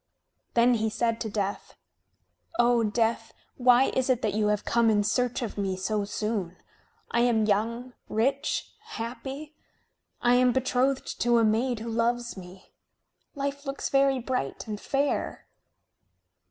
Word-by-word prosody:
Then 240 +1 +5
he 220 -1 +1
said 230 +1 -1
to 220 - -2
Death: 200 -1 -3 0.8
"O 240 -1 +4
Death, 225 +1 0 0.2
why 250 +1 +5
is 260 0 +1
it 255 -1 +2
that 210 - 0
you 210 0 +1
have 210 -1 0
come 235 -1 +3
in 205 -1 +3
search 245 +4 0
of 215 -2 -5
me 190 -2 -1
so 205 +2 -1
soon? 205 -4 -3 0.5
I 235 - +1
am 235 -3 +3
young, 230 +4 -1 0.2
rich, 265 +6 0
happy. 270 - -6 0.7
I 245 - +3
am 250 0 +4
betrothed 260 +1 0
to 240 0 +4
a 230 - +4
maid 225 +2 +1
who 230 - -5
loves 235 +1 0
me. 185 0 -12 0.6
Life 280 0 -3
looks 275 0 -3
very 275 -1 +3
bright 250 - -3
and 210 -1 -5
fair." 280 +1 -1
235 Hz, 145 wpm, -27 LUFS, 215-255 Hz, 0.8 s, Then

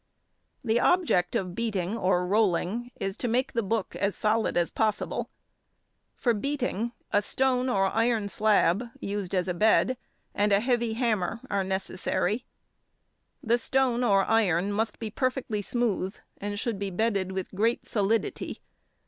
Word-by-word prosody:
The 235 -1 +2
object 280 - +2
of 180 -2 -1
beating 205 -3 -2
or 185 -4 +1
rolling 210 +3 +1
is 195 0 -2
to 245 - -2
make 255 +4 0
the 230 - +1
book 215 -1 -2
as 200 0 0
solid 215 -1 +1
as 170 -1 +1
possible. 215 -2 -1 0.9
For 240 - +1
beating, 240 -1 -2 0.2
a 205 - +3
stone 255 +3 +1
or 195 -5 +2
iron 225 +1 +1
slab, 210 -1 +3 0.2
used 200 -2 -3
as 180 0 +1
a 180 - 0
bed, 220 +6 +3 0.4
and 205 0 +1
a 200 - +5
heavy 240 -1 0
hammer, 225 -3 0
are 200 -1 +1
necessary. 190 +4 -1 1.0
The 235 +2 +2
stone 250 0 +1
or 195 -4 +4
iron 200 -4 +2
must 220 +2 -1
be 220 -2 -5
perfectly 255 -4 -1
smooth, 210 -4 -1 0.2
and 205 0 -3
should 225 -3 -2
be 200 -1 -2
bedded 195 -1 0
with 190 -1 -4
great 225 +5 +1
solidity. 215 +1 -1
215 Hz, 150 wpm, -27 LUFS, 195-235 Hz, 1.0 s, a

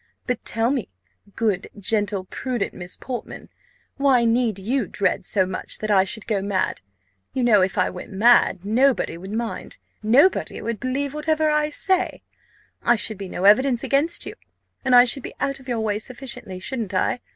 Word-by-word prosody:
But 250 -2 -2
tell 230 +2 0
me, 265 -7 -2 0.5
good, 210 -5 0
gentle, 205 -1 0
prudent 240 +3 -3
Miss 180 0 -5
Portman, 250 -2 -7 0.5
why 270 -4 +3
need 230 -2 +1
you 225 +3 -1
dread 200 - -1
so 190 -3 +2
much 185 0 -3
that 215 0 -3
I 190 -2 +5
should 220 +2 -4
go 210 -4 0
mad? 195 -1 -1 0.5
You 260 - -1
know, 220 -5 +5
if 185 0 0
I 185 - +2
went - - -9
mad, 205 -2 +4
nobody 250 +3 +2
would 190 +4 -9
mind, 230 - -4 0.2
nobody 255 - +3
would 225 -1 -4
believe 270 +3 -2
whatever 310 0 +1
I 300 0 +1
say 370 +4 0 0.6
I 240 - +4
should 220 -2 -2
be 195 -2 -6
no 180 - -5
evidence 240 +4 +4
against 295 +5 +1
you, - - -6 0.5
and 260 -2 +4
I 245 - +9
should 250 +2 +3
be - - -8
out 275 0 -1
of 260 - -16
your 240 -3 -1
way 210 -1 -1
sufficiently, 235 -6 -7
shouldn't 215 -2 -4
I? 215 - +1
230 Hz, 180 wpm, -23 LUFS, 200-265 Hz, 0.6 s, I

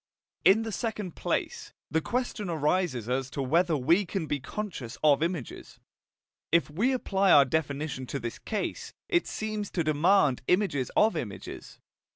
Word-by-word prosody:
In 215 +4 +5
the 225 - -4
second 210 -5 -4
place, - - -3 0.2
the 160 +2 +2
question 235 -1 -2
arises 155 - 0
as 130 +1 -1
to 140 - -4
whether 165 +4 +2
we 165 +10 +3
can 185 -2 -3
be 145 -1 -2
conscious 150 - -6
of 150 -1 +5
images. 165 -6 -4 0.7
If 165 -2 +3
we 215 - +1
apply 200 -6 +1
our 140 - +8
definition 140 -2 -2
to 140 - -3
this 120 -1 -5
case, 215 -2 -4
it 345 -1 +2
seems 215 -1 -3
to 170 - -1
demand 155 -2 +3
images 180 - +1
of 215 -3 +4
images. 105 -11 -7
165 Hz, 155 wpm, -28 LUFS, 140-200 Hz, 0.7 s, our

